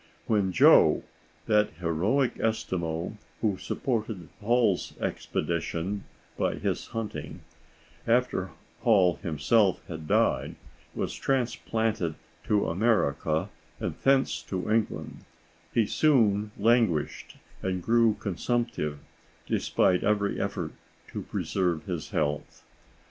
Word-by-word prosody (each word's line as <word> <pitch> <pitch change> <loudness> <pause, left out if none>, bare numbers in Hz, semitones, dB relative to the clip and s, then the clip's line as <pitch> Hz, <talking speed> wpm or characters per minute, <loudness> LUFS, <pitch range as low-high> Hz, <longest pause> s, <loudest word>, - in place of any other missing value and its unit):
When 100 -4 +1
Joe, 85 - +6 0.4
that 105 -5 +3
heroic 90 - +1
Eskimo 90 -4 -2 0.2
who 105 -4 +1
supported 110 -8 -3
Hall's 115 -3 +1
expedition 85 +4 -2 0.3
by - - +1
his - - -2
hunting, 115 -2 -5 0.7
after 115 -6 +2 0.3
Hall 95 -6 +4
himself 95 +5 +2
had 80 -2 -7
died, - - +2 0.4
was - - -2
transplanted 115 - -1 0.3
to 105 -1 +2
America 85 -5 +1 0.3
and - - -2
thence 135 0 +3
to 95 +2 -4
England, 110 -1 -1 0.5
he 115 - +3
soon 110 -8 +3
languished 110 -8 +1 0.2
and 95 -1 -2
grew 115 0 +4
consumptive, 105 -5 -2 0.5
despite 90 -1 +2
every 105 -1 +1
effort - - -3 0.4
to - - -5
preserve 90 -5 -1
his 85 -4 -4
health. 75 -1 -2
105 Hz, 100 wpm, -28 LUFS, 85-115 Hz, 0.7 s, Joe